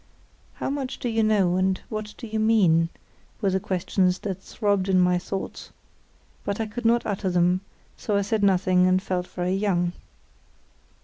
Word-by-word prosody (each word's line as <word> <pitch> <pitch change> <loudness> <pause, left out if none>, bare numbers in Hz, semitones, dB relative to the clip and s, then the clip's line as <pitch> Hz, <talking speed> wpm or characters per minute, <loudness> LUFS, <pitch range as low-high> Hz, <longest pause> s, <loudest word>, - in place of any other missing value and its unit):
"How - - -3
much 275 -2 -3
do - - -4
you 225 0 +1
know, 200 -5 +3
and 190 0 +1
what 215 -1 -5
do - - -8
you 220 0 -3
mean?" 185 -7 +4 0.5
were 200 -3 +1
the 190 - +1
questions 185 0 0
that 190 -2 -4
throbbed 200 -2 -1
in 185 -1 +4
my 180 0 +3
thoughts; 190 +2 -6 0.7
but 200 +1 -3
I 225 - 0
could 230 +3 -7
not 235 +1 +3
utter 200 -2 -1
them, 180 +1 +2 0.4
so 205 -2 -1
I 200 - +1
said 215 +1 -1
nothing 185 -2 +3
and 185 0 +3
felt 180 -2 -3
very 180 0 -2
young. 180 -3 0
190 Hz, 175 wpm, -25 LUFS, 180-215 Hz, 0.7 s, mean